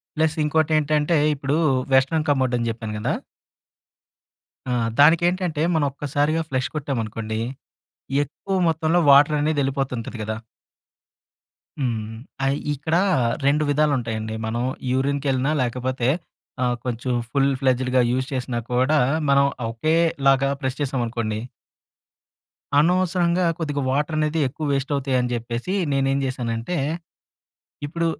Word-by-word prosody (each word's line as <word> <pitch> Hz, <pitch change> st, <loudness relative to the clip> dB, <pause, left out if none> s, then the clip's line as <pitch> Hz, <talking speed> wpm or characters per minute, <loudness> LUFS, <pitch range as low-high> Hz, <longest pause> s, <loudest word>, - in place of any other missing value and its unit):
Plus 160 Hz, 0 st, +1 dB
ఇంకోటి 160 Hz, +1 st, +1 dB
ఏంటంటే, 150 Hz, +2 st, +2 dB, 0.2 s
ఇప్పుడు 140 Hz, +1 st, -1 dB, 0.4 s
వెస్టర్న్ 150 Hz, +4 st, +3 dB
కమోడ్ 130 Hz, -3 st, +2 dB
అని 120 Hz, -1 st, -1 dB
చెప్పాను 110 Hz, -1 st, -6 dB
కదా! -, -, -1 dB, 1.6 s
ఆ! -, -, +1 dB, 0.2 s
దానికేంటంటే, 170 Hz, +1 st, +3 dB
మనం 155 Hz, -3 st, +2 dB
ఒక్కసారిగా 145 Hz, +3 st, 0 dB
ఫ్లష్ 130 Hz, -1 st, 0 dB
కొట్టామనుకోండి, 115 Hz, -6 st, -3 dB, 0.8 s
ఎక్కువ 190 Hz, +7 st, -5 dB
మొత్తంలో 160 Hz, +2 st, +2 dB
వాటర్ 145 Hz, +2 st, +6 dB
అనేది 150 Hz, 0 st, 0 dB
వెళ్ళిపోతుంటది 130 Hz, -4 st, -3 dB
కదా! 110 Hz, +1 st, -3 dB, 1.4 s
హ్మ్. 110 Hz, -4 st, -2 dB, 0.4 s
ఐ -, -, +1 dB, 0.2 s
ఇక్కడ, 150 Hz, +4 st, -1 dB, 0.5 s
2 145 Hz, +2 st, +3 dB
విధాలు 150 Hz, +1 st, +2 dB
ఉంటాయండి. 110 Hz, -2 st, -4 dB
మనం 115 Hz, +2 st, -2 dB, 0.3 s
యూరిన్‌కెళ్ళినా 135 Hz, +1 st, 0 dB
లేకపోతే, 125 Hz, 0 st, -1 dB, 0.6 s
ఆహ్, 120 Hz, -1 st, +1 dB
కొంచెం 125 Hz, 0 st, -2 dB, 0.2 s
ఫుల్ 140 Hz, +1 st, +2 dB
ఫ్లెడ్జెడ్‌గా 130 Hz, -1 st, +2 dB
యూజ్ 130 Hz, +1 st, 0 dB
చేసినా 125 Hz, -2 st, -2 dB
కూడా, 130 Hz, +5 st, +3 dB, 0.3 s
మనం 140 Hz, 0 st, +5 dB, 0.3 s
ఒకేలాగా 140 Hz, 0 st, +2 dB
ప్రెస్ 130 Hz, 0 st, -2 dB
చేసామనుకోండి 120 Hz, -5 st, -2 dB, 1.4 s
అనవసరంగా, 180 Hz, +2 st, +2 dB
కొద్దిగా 145 Hz, -4 st, -2 dB
వాటరనేది 155 Hz, +3 st, 0 dB
ఎక్కువ 155 Hz, +4 st, -6 dB
వేస్ట్ 140 Hz, +1 st, -1 dB
అవుతాయని 130 Hz, -3 st, 0 dB
చెప్పేసి, 120 Hz, +7 st, -4 dB, 0.2 s
నేనేం 135 Hz, 0 st, +1 dB
చేశానంటే, 120 Hz, +3 st, -3 dB, 1.1 s
ఇప్పుడు 170 Hz, +3 st, -2 dB
135 Hz, 110 wpm, -23 LUFS, 125-155 Hz, 1.6 s, వాటర్